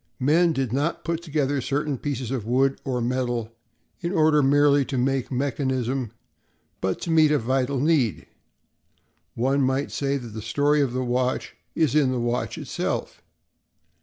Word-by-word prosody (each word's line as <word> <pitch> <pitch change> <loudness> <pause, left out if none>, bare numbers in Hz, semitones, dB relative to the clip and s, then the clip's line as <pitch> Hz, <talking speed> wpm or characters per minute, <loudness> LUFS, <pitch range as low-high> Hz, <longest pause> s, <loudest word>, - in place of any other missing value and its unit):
Men 160 +6 +3
did 135 -6 -2
not 145 +5 -1
put 170 0 -2
together 145 -4 -1
certain 140 +1 -2
pieces 130 -4 -3
of 130 -5 -2
wood 130 +4 +1
or 125 -2 -2
metal 120 -2 -1 0.5
in 170 0 -2
order 155 -4 +4
merely 145 +1 +4
to 135 - -3
make 135 +1 0
mechanism, 130 -2 -1 0.7
but 95 -1 -1
to 170 - -3
meet 160 -2 +5
a 150 - +3
vital 130 +2 0
need. 135 - +1 1.1
One 135 +4 +1
might 130 0 +2
almost - - -5
say 140 0 0
that 120 -3 -8
the 110 0 -7
story 145 +6 +2
of 130 -4 0
the 130 0 -1
watch 125 +1 -1 0.2
is 160 -4 +2
in 145 -4 +3
the 125 - -1
watch 120 +1 -2
itself. - - -3
135 Hz, 165 wpm, -24 LUFS, 125-145 Hz, 1.1 s, meet